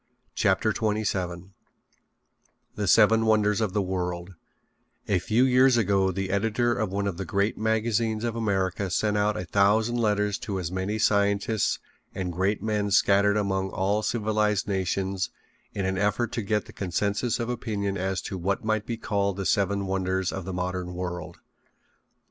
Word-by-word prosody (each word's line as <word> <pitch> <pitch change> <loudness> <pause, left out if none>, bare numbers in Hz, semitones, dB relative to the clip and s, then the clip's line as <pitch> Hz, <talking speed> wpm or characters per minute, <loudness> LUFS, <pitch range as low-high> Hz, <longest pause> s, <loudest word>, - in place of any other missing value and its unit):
CHAPTER - - +2
XXVII 95 -4 -2 1.2
THE 105 -1 -3
SEVEN 110 +4 +5
WONDERS 105 -1 +3
OF 105 -4 -1
THE 105 - +1
WORLD 90 -1 -3 0.7
A 95 - +2
few 110 +7 +2
years 130 -1 +5
ago 100 -3 +2
the 95 0 -3
editor 110 +4 +1
of 110 -4 -2
one 100 +1 -1
of 100 -4 -2
the 95 - -3
great 100 +4 0
magazines 110 0 0
of 115 -1 -2
America 100 -3 -1
sent 105 +3 0
out 105 +1 +1
a 90 - -4
thousand 105 +6 +2
letters 105 -3 +1
to 95 -2 -3
as 85 -2 -4
many 95 +3 -2
scientists 100 0 +1 0.4
and 90 -2 -3
great 95 +4 0
men 105 -2 0
scattered 100 +1 +4
among 95 -2 0
all 100 +3 0
civilized 105 -2 0
nations 95 -1 -1 0.4
in 100 - -3
an 95 0 -1
effort 105 +3 0
to 115 - -2
get 105 0 -1
the - - -13
consensus 100 +5 -1
of 115 - -2
opinion 105 -5 -2
as 95 0 -2
to 95 - -5
what 100 +4 -1
might 110 -1 0
be 115 - -3
called 100 -3 -1
the 95 - -3
seven 100 0 +1
wonders 95 -1 -1
of 95 -3 -5
the 95 - -4
modern 90 0 -3
world. 90 -2 -5
100 Hz, 165 wpm, -26 LUFS, 95-110 Hz, 1.2 s, SEVEN